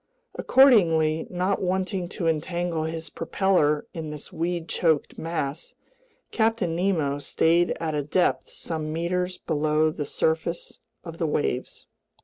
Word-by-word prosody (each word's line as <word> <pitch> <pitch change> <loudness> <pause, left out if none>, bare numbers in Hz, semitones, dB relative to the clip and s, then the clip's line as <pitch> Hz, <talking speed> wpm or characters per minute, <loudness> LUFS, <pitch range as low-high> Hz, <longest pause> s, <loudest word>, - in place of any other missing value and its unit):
Accordingly, 165 - +4
not 185 +2 -1
wanting 185 -1 -1
to 175 - -4
entangle 165 +1 -1
his 160 0 -5
propeller 150 -7 +1
in 160 -2 -5
this 150 +3 -8
weed 170 0 -2
choked 160 -4 0
mass, 160 -2 -4 0.6
Captain 220 -7 +1
Nemo 165 -6 0
stayed 165 +4 +2
at 160 -2 -2
a 150 - 0
depth 145 -3 0
some 155 -2 -4
meters 180 +3 -1
below 155 0 +1
the 150 -1 -4
surface 160 +3 -2 0.2
of 165 -1 -9
the 165 - +1
waves. 140 -4 -2
165 Hz, 125 wpm, -25 LUFS, 155-180 Hz, 0.6 s, Accordingly